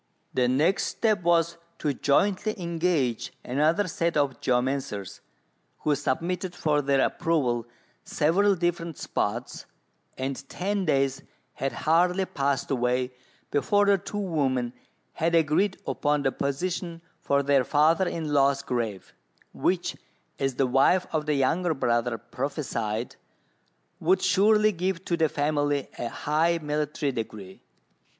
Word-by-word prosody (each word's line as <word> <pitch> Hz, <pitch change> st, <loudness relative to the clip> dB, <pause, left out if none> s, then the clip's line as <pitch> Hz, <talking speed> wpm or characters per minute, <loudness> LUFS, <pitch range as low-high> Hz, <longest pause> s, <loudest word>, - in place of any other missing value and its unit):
The 125 Hz, -1 st, +2 dB
next 150 Hz, +10 st, +2 dB
step 215 Hz, -5 st, 0 dB
was 170 Hz, -1 st, +2 dB, 0.2 s
to 150 Hz, -2 st, -1 dB
jointly 200 Hz, -, +1 dB
engage 165 Hz, -8 st, 0 dB
another 155 Hz, +9 st, +2 dB
set 170 Hz, -3 st, -1 dB
of 140 Hz, -3 st, 0 dB
geomancers, 125 Hz, -6 st, -1 dB, 0.6 s
who 150 Hz, -, +2 dB
submitted 170 Hz, +6 st, -2 dB
for 150 Hz, -2 st, +1 dB
their 140 Hz, -1 st, +2 dB
approval 130 Hz, -9 st, 0 dB, 0.4 s
several 195 Hz, +7 st, +2 dB
different 170 Hz, -2 st, -2 dB
spots, 120 Hz, +4 st, -3 dB, 0.5 s
and 135 Hz, +1 st, -4 dB
ten 195 Hz, +1 st, -2 dB
days 135 Hz, -3 st, +1 dB, 0.3 s
had 135 Hz, -, -2 dB
hardly 180 Hz, +4 st, +3 dB
passed 140 Hz, -4 st, -1 dB
away 125 Hz, 0 st, 0 dB, 0.4 s
before 205 Hz, +9 st, +2 dB
the 200 Hz, -1 st, +4 dB
two 205 Hz, -, -6 dB
women 135 Hz, -10 st, 0 dB, 0.4 s
had 165 Hz, +1 st, +1 dB
agreed 165 Hz, +5 st, +2 dB
upon 145 Hz, -1 st, 0 dB
the 135 Hz, -, +2 dB
position 165 Hz, +5 st, -3 dB, 0.2 s
for 140 Hz, 0 st, +1 dB
their 140 Hz, -2 st, +3 dB
father 160 Hz, +7 st, +3 dB
in 160 Hz, -3 st, -3 dB
law's 140 Hz, -1 st, +3 dB
grave, 115 Hz, -6 st, -3 dB, 0.4 s
which, -, -, 0 dB, 0.4 s
as 135 Hz, -2 st, 0 dB
the 135 Hz, -, +2 dB
wife 135 Hz, +8 st, +3 dB
of 155 Hz, -1 st, -1 dB
the 150 Hz, -, +2 dB
younger 160 Hz, +5 st, +1 dB
brother 120 Hz, -2 st, 0 dB
prophesied, 120 Hz, -3 st, -4 dB, 0.8 s
would 185 Hz, +4 st, +2 dB
surely 210 Hz, +3 st, +4 dB
give 185 Hz, -1 st, -2 dB
to 170 Hz, -, 0 dB
the 160 Hz, -2 st, +2 dB
family 145 Hz, -1 st, 0 dB
a 120 Hz, -, -2 dB
high 160 Hz, +6 st, +1 dB
military 150 Hz, -1 st, -2 dB
degree. 110 Hz, -5 st, -7 dB
150 Hz, 130 wpm, -26 LUFS, 135-175 Hz, 0.8 s, the